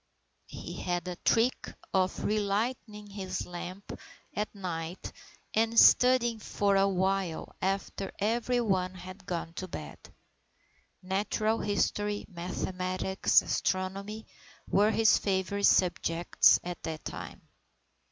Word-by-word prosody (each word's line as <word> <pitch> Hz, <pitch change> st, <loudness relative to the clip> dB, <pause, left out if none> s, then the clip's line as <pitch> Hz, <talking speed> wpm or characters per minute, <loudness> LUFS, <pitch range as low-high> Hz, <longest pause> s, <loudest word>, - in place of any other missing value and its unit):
He -, -, -8 dB
had 175 Hz, 0 st, -2 dB
a 180 Hz, -, -3 dB
trick 230 Hz, +3 st, +1 dB, 0.2 s
of 185 Hz, -1 st, +1 dB
relighting 210 Hz, +1 st, -1 dB
his 195 Hz, -2 st, -5 dB
lamp 180 Hz, +2 st, -8 dB, 0.3 s
at 210 Hz, +1 st, -3 dB
night 175 Hz, -2 st, -5 dB, 0.4 s
and 225 Hz, +1 st, +3 dB
studying 245 Hz, -2 st, +5 dB
for 200 Hz, -1 st, 0 dB
a 195 Hz, 0 st, +4 dB
while 190 Hz, -2 st, -1 dB
after 195 Hz, 0 st, -2 dB
every 235 Hz, +4 st, +1 dB
one 185 Hz, -4 st, 0 dB
had 185 Hz, +1 st, -11 dB
gone 170 Hz, -2 st, -3 dB
to 185 Hz, -, -5 dB
bed. 75 Hz, -, -8 dB, 1.0 s
Natural 210 Hz, +4 st, 0 dB
history, 205 Hz, 0 st, -1 dB
mathematics, 185 Hz, +1 st, 0 dB
and -, -, -11 dB
astronomy 195 Hz, +3 st, -2 dB, 0.4 s
were 205 Hz, +2 st, +4 dB
his 220 Hz, 0 st, +4 dB
favourite 200 Hz, +1 st, +1 dB
subjects 175 Hz, -2 st, +4 dB
at 175 Hz, -1 st, -6 dB
that 160 Hz, -1 st, -6 dB
time. -, -, -7 dB
195 Hz, 115 wpm, -30 LUFS, 185-210 Hz, 1.0 s, studying